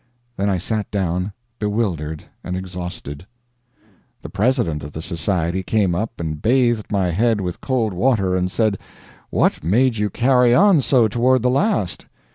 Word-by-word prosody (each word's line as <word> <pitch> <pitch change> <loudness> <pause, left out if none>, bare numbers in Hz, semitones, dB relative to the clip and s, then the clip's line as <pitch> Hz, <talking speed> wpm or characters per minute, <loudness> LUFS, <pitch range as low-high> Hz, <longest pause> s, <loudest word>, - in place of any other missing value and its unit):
Then 100 -1 0
I 95 - +1
sat 105 +3 -2
down 90 -1 -1 0.3
bewildered 95 -8 -2 0.2
and 90 - -3
exhausted. 90 -4 -7 1.0
The - - -7
president 105 - 0
of 70 +1 -8
the 80 - -5
society 85 +2 -1
came 95 -1 +1
up 110 +6 -3
and 80 -2 -4
bathed 120 -2 +2
my 95 -4 +1
head 110 +4 +1
with 90 -2 -4
cold 120 -6 0
water, 95 -2 +1
and 90 0 0
said: 110 0 0 0.5
"What - - +1
made 115 - +2
you 105 0 0
carry 125 +2 +3
on 195 -5 +5
so 125 -3 +3
toward 120 +3 +2
the 125 - +3
last?" 140 - 0
100 Hz, 155 wpm, -20 LUFS, 90-120 Hz, 1.0 s, on